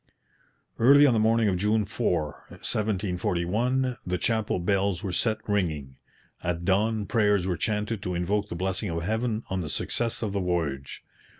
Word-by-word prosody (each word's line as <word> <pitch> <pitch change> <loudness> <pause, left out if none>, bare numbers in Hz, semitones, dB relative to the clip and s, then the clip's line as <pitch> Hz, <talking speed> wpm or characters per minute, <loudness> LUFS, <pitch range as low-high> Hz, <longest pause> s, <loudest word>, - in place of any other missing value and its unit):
Early 140 +5 +7
on 135 - +5
the 110 - +2
morning 110 0 +3
of 95 -3 +1
June 105 +3 +1
4, 90 -8 -2
1741, 105 +5 -1
the 90 0 -1
chapel 110 +2 0
bells 95 0 0
were 95 -3 -3
set 110 +1 +1
ringing. 80 -10 -1 0.5
At 85 0 -2
dawn 105 +3 +1
prayers 105 -4 +2
were 95 -2 0
chanted 105 +2 -1
to 90 -3 -3
invoke 100 +4 0
the - - -4
blessing 95 +3 -2
of 85 0 -2
Heaven 110 +3 -1
on 95 -1 0
the 80 - -4
success 115 +8 -1
of 105 -3 -2
the 100 - 0
voyage. 80 -7 -2
100 Hz, 165 wpm, -27 LUFS, 90-110 Hz, 0.5 s, Early